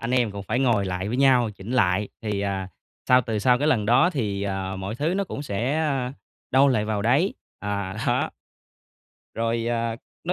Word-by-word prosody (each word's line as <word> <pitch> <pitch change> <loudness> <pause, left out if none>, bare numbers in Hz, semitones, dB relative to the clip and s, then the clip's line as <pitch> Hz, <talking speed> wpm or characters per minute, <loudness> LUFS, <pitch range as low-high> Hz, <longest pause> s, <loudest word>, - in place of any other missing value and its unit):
anh 115 - -3
em 125 -3 +2
cũng 100 -1 -6
phải 110 - -1
ngồi 120 -6 +2
lại 95 +1 -3
với 120 - -1
nhau, 130 -4 +4
chỉnh 100 +1 -10
lại 100 -4 +2
thì, 105 -2 -2
à, 95 -2 -2 0.4
sau 125 0 +7
từ 110 -3 -2
sau 125 +4 +3
cái 145 - 0
lần 110 -9 +2
đó 125 - +5
thì, 105 - -2
à, 95 -1 -3
mọi 95 +3 -4
thứ 155 +8 -1
nó 200 - 0
cũng 145 -6 -6
sẽ, 125 +7 -1
ơ, 135 -5 -1 0.4
đâu 135 +2 +5
lại 110 -6 +2
vào 105 -1 -1
đấy. 140 - +2 0.3
À, 100 -1 -3
đó. - - +1 1.0
Rồi, 115 0 -1
à, 115 -1 -1 0.3
nó 175 - 0
115 Hz, 205 wpm, -24 LUFS, 100-130 Hz, 1.0 s, sau